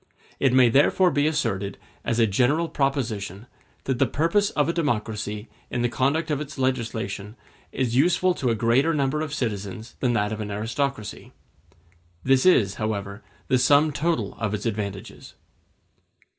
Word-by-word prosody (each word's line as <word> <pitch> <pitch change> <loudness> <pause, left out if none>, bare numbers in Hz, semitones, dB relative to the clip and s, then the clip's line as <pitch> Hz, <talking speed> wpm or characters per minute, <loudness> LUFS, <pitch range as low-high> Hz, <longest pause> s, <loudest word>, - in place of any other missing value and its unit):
It 135 - +3
may 130 -1 +6
therefore 150 +9 +4
be 145 +1 +2
asserted, 100 -10 -1 0.3
as 115 - -1
a 115 - +5
general 130 - +2
proposition, 115 - -2 0.4
that 130 -2 -2
the - - +4
purpose 170 +7 +1
of 145 -2 0
a 170 - 0
democracy 105 -8 -2 0.2
in 120 - -2
the 120 - +2
conduct 140 +7 0
of 150 -1 -1
its 140 -1 -7
legislation 115 -5 -2 0.4
is 125 -3 -1
useful 180 +6 +3
to 130 -7 -1
a 115 - +2
greater 125 +9 +2
number 140 +1 0
of 155 -2 -4
citizens 110 -4 -4
than 125 -2 +1
that 105 -2 0
of 110 0 -4
an 105 - -4
aristocracy. 110 +3 -3 0.9
This 135 +4 +3
is, 100 - +4
however, 100 -1 -3 0.3
the 130 - +3
sum 145 +4 +4
total 165 +3 -1
of 110 -2 -1
its 105 - -6
advantages. 100 -3 -5
125 Hz, 155 wpm, -24 LUFS, 105-145 Hz, 0.9 s, may